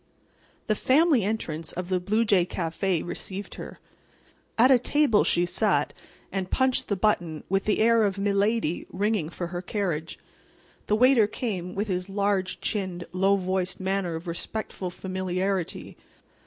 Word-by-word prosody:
The 215 - +2
"Family 275 - +3
Entrance" 165 -7 -3
of 180 0 -5
the 185 -1 +1
Blue 215 +6 +1
Jay 195 -4 +4
Café 175 0 -2
received 190 +3 -5
her. - - -8 0.8
At 250 +4 +6
a 255 - +7
table 280 -4 +3
she 175 +1 +2
sat, 175 +1 +1 0.4
and 190 -2 -3
punched 260 0 +1
the 200 - 0
button 175 -6 0
with 195 +1 +1
the 210 - +2
air 230 +1 +4
of 200 -2 +1
milady 200 -2 0
ringing 200 -4 0
for 175 +1 -5
her 175 - -3
carriage. 180 -5 -3 0.7
The 210 - +3
waiter 245 -2 +5
came 190 -6 -4
with 205 +2 -1
his 180 -1 -2
large 200 -1 0
chinned, 185 -5 -2
low 190 +2 +3
voiced 185 -1 -2
manner 190 -3 -1
of 160 +2 -6
respectful 185 +2 -4
familiarity. 185 0 -3
195 Hz, 150 wpm, -26 LUFS, 180-215 Hz, 0.8 s, a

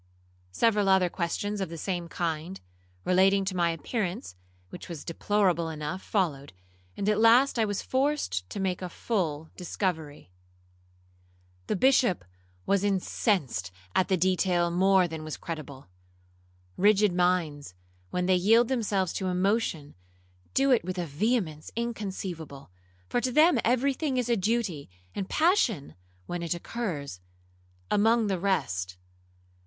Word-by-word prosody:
Several 210 - +2
other 190 -2 +4
questions 200 +4 -2
of 190 - -2
the 165 - -7
same 175 +1 -3
kind, 170 +2 -3 0.5
relating 195 +2 +4
to 190 -1 -2
my 170 -1 +2
appearance, 170 - -3 0.4
which - - -9
was 165 -4 -7
deplorable 180 -1 +1
enough, 155 +4 -5
followed, 145 - -1 0.4
and 200 - -2
at 210 0 +2
last 235 +3 +5
I 220 - +4
was 205 -1 -3
forced 260 - -1
to - - -5
make 190 -2 -1
a 180 - -4
full 160 -7 -2
discovery. 160 - -4 1.4
The - - 0
Bishop 245 - +3 0.4
was 200 -1 +2
incensed 190 - 0 0.2
at 185 - +2
the 190 - +2
detail 180 -1 +2
more 190 +1 +4
than 160 -2 -6
was 155 -1 -5
credible. 145 -5 -7 0.9
Rigid 205 0 +4
minds, 170 - 0 0.3
when 180 - -1
they 185 - +3
yield 225 +6 +4
themselves 205 -8 0
to 190 - -2
emotion, 180 -5 0 0.6
do 270 0 +4
it 245 - +4
with 185 +1 -4
a 175 - -1
vehemence 160 - -1
inconceivable, 190 - -5 0.4
for 240 - 0
to 255 +2 -1
them 305 0 +5
every 255 +4 +2
thing 270 -1 -2
is 245 -1 0
a 235 - +4
duty, 200 - -1 0.2
and 195 -1 -4
passion 280 - +2 0.3
(when 175 - -4
it 170 +1 -1
occurs) 170 - -5 0.7
among 225 +2 +3
the 195 -3 -1
rest. 95 - -1
185 Hz, 140 wpm, -28 LUFS, 165-215 Hz, 1.4 s, last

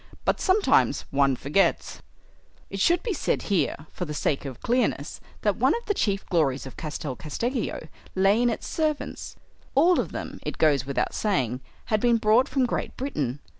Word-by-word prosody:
But - - +1
sometimes 390 +2 +3
one 140 -1 +3
forgets." 145 +10 0 0.7
It 195 - -4
should 340 - +3
be 450 - -1
said 315 - -1
here, 155 -3 0
for 180 - -4
the 150 -2 -5
sake 145 0 -1
of 130 -4 -7
clearness, 250 +2 0 0.2
that - - +1
one - - +3
of 470 - -6
the 415 - +1
chief 200 - -1
glories 145 -8 +1
of 135 - -9
Castel 150 -3 -5
Casteggio 230 - -3 0.3
lay 195 +4 +4
in 245 - +3
its 230 - -3
servants. 310 -2 -2 0.4
All 340 +6 +5
of - - -2
them, - - -6
it - - -5
goes 145 -4 +3
without 140 - -1
saying, 130 - 0 0.3
had 215 - +4
been 235 +1 +3
brought 225 +5 +3
from 265 -2 +2
Great 240 - -3
Britain. 145 - -3
195 Hz, 175 wpm, -26 LUFS, -, 0.7 s, All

